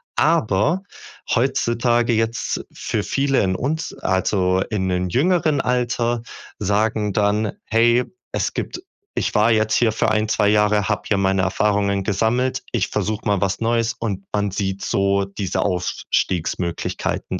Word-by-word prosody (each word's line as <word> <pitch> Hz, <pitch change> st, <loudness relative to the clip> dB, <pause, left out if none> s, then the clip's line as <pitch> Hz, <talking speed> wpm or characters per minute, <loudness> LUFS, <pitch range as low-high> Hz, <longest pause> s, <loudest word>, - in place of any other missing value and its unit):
Aber 160 Hz, -, +2 dB, 0.5 s
heutzutage 120 Hz, -1 st, +1 dB
jetzt 115 Hz, +1 st, -1 dB
für 105 Hz, -, -3 dB
viele 135 Hz, +2 st, +1 dB
in 95 Hz, -1 st, 0 dB
uns 155 Hz, -, -2 dB
also 95 Hz, 0 st, +1 dB
in 95 Hz, -4 st, -1 dB
den 90 Hz, 0 st, -1 dB
jüngeren 155 Hz, -, +2 dB
Alter 120 Hz, -1 st, 0 dB, 0.4 s
sagen 105 Hz, +1 st, +1 dB
dann: 105 Hz, +1 st, +1 dB
„Hey, 120 Hz, +2 st, +3 dB, 0.3 s
es -, -, -1 dB
gibt 355 Hz, -, -4 dB, 0.4 s
ich -, -, -1 dB
war 105 Hz, +2 st, +4 dB
jetzt 110 Hz, -1 st, +2 dB
hier 115 Hz, -2 st, +3 dB
für 110 Hz, -, +1 dB
1, 110 Hz, 0 st, +1 dB
2 105 Hz, -, +2 dB
Jahre, 105 Hz, -1 st, +3 dB
habe 105 Hz, -, 0 dB
hier 100 Hz, -, +2 dB
meine 95 Hz, 0 st, +2 dB
Erfahrungen 100 Hz, +1 st, +1 dB
gesammelt. 115 Hz, +6 st, 0 dB
Ich -, -, 0 dB
versuche 110 Hz, 0 st, -2 dB
mal 100 Hz, -2 st, +1 dB
was 95 Hz, -1 st, 0 dB
Neues.“ 115 Hz, 0 st, +1 dB
Und 100 Hz, -4 st, -4 dB
man 105 Hz, -1 st, 0 dB
sieht 95 Hz, 0 st, -3 dB
so 100 Hz, 0 st, +1 dB
diese 100 Hz, -1 st, -3 dB
Aufstiegsmöglichkeiten 90 Hz, -1 st, -2 dB
105 Hz, 140 wpm, -21 LUFS, 100-120 Hz, 0.5 s, war